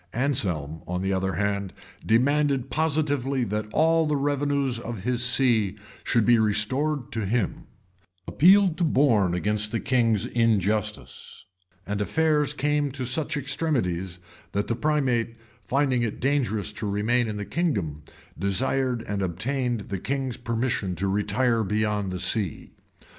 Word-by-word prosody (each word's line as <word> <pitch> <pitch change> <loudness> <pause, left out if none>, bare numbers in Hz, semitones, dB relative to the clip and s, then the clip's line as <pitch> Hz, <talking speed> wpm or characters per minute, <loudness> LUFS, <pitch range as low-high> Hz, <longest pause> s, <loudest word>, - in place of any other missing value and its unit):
[] - - -32
Anselm, 90 - -1
on 90 +2 -2
the 95 0 0
other 95 0 -1
hand, 100 +1 -1 0.3
demanded 135 +3 +2
positively 145 -4 0
that 105 -1 -2
all 160 +2 +3
the 150 - +1
revenues 140 -3 0
of 115 -5 -6
his 125 0 0
see 120 -6 +2 0.3
should 115 -3 +2
be 120 -1 +5
restored 120 +7 0
to 110 -1 -2
him; 115 -1 -1 0.6
appealed 190 +1 +5
to - - +2
Borne 120 - +3
against 105 +3 0
the 115 - -1
king's 115 -5 +2
injustice;[] 105 - -1 0.4
and 100 +1 -2
affairs 150 +4 +1
came 145 0 +1
to 130 -1 -4
such 150 +5 -1
extremities, 120 - -1 0.4
that 100 +1 0
the 115 - -1
primate, 130 -6 0 0.3
finding 130 +4 +1
it 115 -3 -2
dangerous 120 -7 0
to 105 0 -4
remain 115 +4 +1
in 105 -1 -4
the 100 - -4
kingdom, 100 - -2 0.4
desired 125 +4 0
and 100 -3 -3
obtained 120 +6 -1
the 100 -2 -3
king's 135 +2 -2
permission 115 -5 -2
to 100 - -2
retire 110 +4 +1
beyond 105 -2 -1
sea. 95 -1 -1
115 Hz, 140 wpm, -25 LUFS, 100-140 Hz, 0.6 s, be